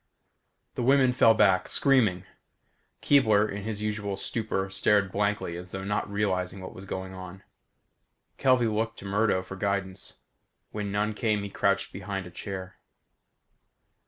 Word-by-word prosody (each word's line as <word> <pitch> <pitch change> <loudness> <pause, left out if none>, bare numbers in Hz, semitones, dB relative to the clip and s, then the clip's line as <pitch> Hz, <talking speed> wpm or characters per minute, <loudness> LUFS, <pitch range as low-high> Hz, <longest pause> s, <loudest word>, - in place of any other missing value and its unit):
The - - -3
women 130 0 +4
fell 115 -2 +5
back, 100 -4 +3
screaming. 110 -10 +2 0.8
Keebler, 110 -7 +4
in 100 0 -5
his 105 -1 -4
usual 105 -2 -2
stupor 100 -2 -2
stared 100 0 +2
blankly 100 -4 -1
as 90 +1 -8
though 95 +1 -6
not 105 0 -2
realizing 95 -2 -1
what 95 - -8
was 95 - -10
going 95 -1 -5
on. 95 0 -9 1.0
Kelvey 130 -3 +4
looked 110 +1 -1
to - - -10
Murdo 100 -1 +1
for 95 +1 -8
guidance. 95 -1 -3 0.6
When 105 -1 -4
none 105 +1 0
came 105 -2 0
he 100 - -6
crouched 100 -1 0
behind 95 -1 -5
a 90 - -10
chair. 95 0 -7
100 Hz, 145 wpm, -27 LUFS, 95-110 Hz, 1.0 s, fell